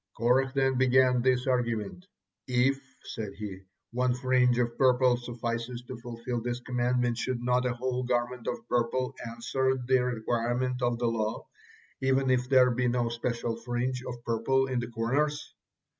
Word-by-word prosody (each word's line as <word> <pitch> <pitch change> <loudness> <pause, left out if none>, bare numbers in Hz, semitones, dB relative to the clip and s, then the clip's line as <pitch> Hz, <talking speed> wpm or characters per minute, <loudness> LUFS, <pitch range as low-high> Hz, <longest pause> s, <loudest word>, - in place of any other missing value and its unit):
Korah 125 +3 +3
then 135 -1 +2
began 130 -1 +4
this 125 0 +2
argument. 120 - -1 0.4
"If," 130 +2 +2 0.2
said 105 -3 -6
he, 100 -2 -6 0.3
"one 125 +1 +1
fringe 125 -1 +3
of 120 -1 0
purple 125 -1 +4
suffices 120 0 -4
to - - -8
fulfil 120 0 -5
this 120 +1 -3
commandment, 125 -1 0
should 130 -2 -1
not 125 +1 +1
a 125 - 0
whole 125 +1 -2
garment 125 -1 -1
of 120 -1 -4
purple 120 +2 0 0.2
answered 130 +2 -1
the 130 +1 +4
requirements 120 +1 -1
of 120 -1 +1
the 120 - -1
law, 110 -2 -1 0.6
even 135 0 +2
if 125 0 +1
there 130 -2 +6
be 125 +1 0
no 120 -1 +1
special 115 0 -2
fringe 120 +2 -2
of 120 -2 -7
purple 120 +4 +1
in 130 -2 -1
the 120 - -3
corners?" 135 +6 -1
125 Hz, 160 wpm, -29 LUFS, 120-130 Hz, 0.6 s, there